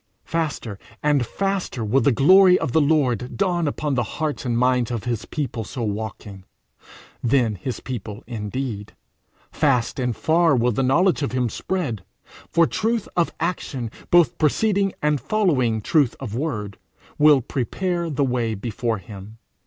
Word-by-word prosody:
Faster 150 -11 -3 0.2
and 145 -3 +3
faster 195 - -2
will 130 +6 +2
the 140 - +3
glory 185 - +6
of - - -2
the 160 - +3
Lord 130 -6 +1
dawn 175 -5 +1
upon 145 0 -2
the 125 - +1 0.2
hearts 155 -3 -2
and 120 -2 0
minds 125 -1 +2
of 120 -4 -3
his 120 -3 -3
people 125 -6 -4
so 120 +3 -5
walking 105 -2 -5 0.8
then 120 -2 +2
his 105 +6 -5
people 115 -4 -6
indeed; 110 -1 -5 0.6
fast 135 -5 +1
and 125 -2 -1
far 165 -2 +3
will 125 0 +2
the 115 - -1
knowledge 170 +8 +3
of 140 - -2
him 125 -2 0
spread, 135 - -3 0.5
for 170 - +4
truth 225 +4 -1
of 170 -1 +1
action, 135 -8 -3 0.2
both 170 -8 +4
preceding 195 +5 +2
and 150 -3 +1
following 135 - +1
truth 140 -1 +2
of 120 -6 -6
word, 110 -7 -3 0.4
will 150 -1 +7
prepare 170 - -2
the 145 -2 0
way 120 -3 -1
before 115 +2 -2
him. 100 +3 -11
130 Hz, 155 wpm, -22 LUFS, 115-160 Hz, 0.8 s, will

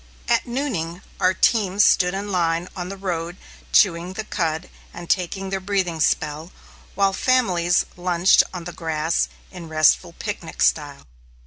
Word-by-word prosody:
At - - +1
nooning 200 - -3 0.2
our 185 0 +2
teams 205 -2 +3
stood 180 0 +3
in 200 +1 -4
line 170 -1 0
on 180 -1 -5
the 195 - -7
road 175 -2 -4 0.3
chewing 175 -2 +3
the 220 - -4
cud 165 -4 -2 0.2
and 175 - -9
taking 190 +2 -1
their 195 - -1
breathing 185 -4 -1
spell, 155 +2 0 0.4
while 195 0 +2
families 185 -8 +2
lunched 175 +1 +4
on 180 -2 -6
the 175 +1 -7
grass 160 0 -1 0.2
in 175 -3 -9
restful 155 -1 +3
picnic 70 - -4
style. 70 +2 0
180 Hz, 145 wpm, -22 LUFS, 165-195 Hz, 0.4 s, lunched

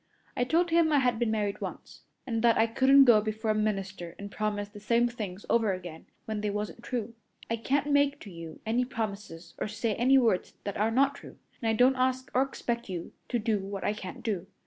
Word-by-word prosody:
I 245 - +1
told 335 +5 +2
him 330 -1 +4
I 295 - +4
had 245 -4 +2
been 240 -2 +1
married 210 -2 -1
once, - - -7 0.2
and 230 -3 -1
that 235 -1 +4
I 225 - +5
couldn't 265 +4 +6
go 230 -4 +6
before 215 +1 -1
a - - +2
minister 195 -5 -2
and 200 0 -8
promise 205 -1 -2
the 205 0 -12
same 235 +3 +2
things 210 -5 -6
over 225 -4 +2
again 175 -3 -8 0.2
when 215 -1 -3
they 210 - -1
wasn't 210 +2 -4
true. 235 -2 -4 0.4
I 230 - +1
can't 280 +5 0
make 285 0 +3
to 200 - -10
you 165 -2 -9
any 235 +3 +1
promises 205 -8 -5
or - - -1
say 220 +1 -1
any 255 +5 +4
words 230 -8 +1
that 200 - -4
are 215 +2 +2
not 275 +4 +3
true, - - -12 0.2
and 225 - 0
I - - +3
don't 250 +4 +4
ask 255 0 0
or 255 - +4
expect 235 -4 -3
you 175 -3 -5 0.2
to 245 - +1
do 220 -2 0
what 195 0 -5
I 205 - +1
can't 190 -3 -8
do. 195 -5 -2
220 Hz, 225 wpm, -29 LUFS, 205-250 Hz, 0.4 s, couldn't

